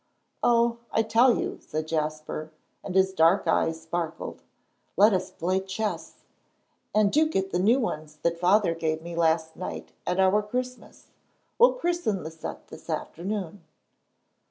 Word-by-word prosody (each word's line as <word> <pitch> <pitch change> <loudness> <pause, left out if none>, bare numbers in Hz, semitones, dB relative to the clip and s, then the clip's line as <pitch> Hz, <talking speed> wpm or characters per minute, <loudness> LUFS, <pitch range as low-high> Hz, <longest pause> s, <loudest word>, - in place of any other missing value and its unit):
"Oh, 235 0 +3
I 225 - +2
tell 230 +3 +4
you," - - -3
said 155 +1 -4
Jasper, 155 0 -3 0.3
and 185 - -6
his 190 0 +3
dark 170 +2 +4
eyes 160 0 +1
sparkled, 165 0 -4 0.6
"let 210 +3 +6
us 185 0 -1
play 185 +1 -1
chess. 195 +3 -4 0.7
And 210 -2 +4
do 310 +4 +3
get 195 -8 -1
the 175 - 0
new 225 +8 +4
ones 155 - -4
that 170 0 0
Father 185 0 +3
gave 160 -1 -2
me 170 0 -7
last 160 -1 +1
night 185 - -6 0.2
at 180 +1 0
our 190 +2 +4
Christmas. 250 +4 -6 0.5
We'll 485 +2 +7
christen 345 - -1
the 160 - -6
set 160 0 -8
this - - -12
afternoon." 190 0 -4
185 Hz, 150 wpm, -26 LUFS, 165-215 Hz, 0.7 s, We'll